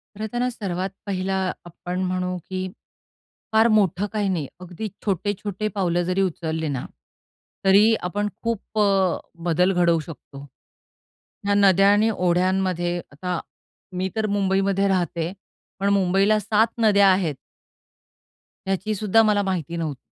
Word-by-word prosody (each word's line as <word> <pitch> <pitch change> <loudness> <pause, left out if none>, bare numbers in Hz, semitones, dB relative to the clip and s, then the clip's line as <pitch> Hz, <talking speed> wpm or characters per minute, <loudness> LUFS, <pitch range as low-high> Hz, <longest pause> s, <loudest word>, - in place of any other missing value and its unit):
खरंतर 220 +3 -3
हा 250 - +1
सर्वात 190 -5 -3 0.2
पहिला 190 -1 -2 0.3
आपण 175 +2 -5
म्हणू 180 0 -2
की 185 0 -3 0.9
फार 220 +1 +5
मोठं 195 -2 +2
काही 205 -2 0
नाही. 165 -7 -1
अगदी 180 +4 -6 0.2
छोटे-छोटे 205 +1 -2
पावलं 175 -3 +1
जरी 185 +2 0
उचलली 160 -3 -2
ना, 135 -3 -3 0.8
तरी 205 +4 +6 0.2
आपण 205 +2 -1 0.2
खूप 225 -1 -3
अ, - - +5 0.6
बदल 180 +3 +3
घडवू 170 -2 +3
शकतो, 150 -3 -10 1.1
ह्या 200 - +2
नद्या 195 0 +5
आणि 215 +2 +3
ओढ्यांमध्ये. 180 0 +1
आता 175 +4 -3 0.6
मी 185 +1 -1
तर 220 -1 0
मुंबईमध्ये 195 0 +1
राहते, 175 -3 -1 0.5
पण 200 +1 +1
मुंबईला 195 +2 +3
7 215 +2 +2
नद्या 200 -2 +5
आहेत 180 -6 +1 1.3
ह्याचीसुद्धा 210 +2 +2
मला 210 -2 +3
माहिती 175 -4 -2
नव्हती. 155 -5 -3
190 Hz, 125 wpm, -23 LUFS, 175-205 Hz, 1.3 s, तरी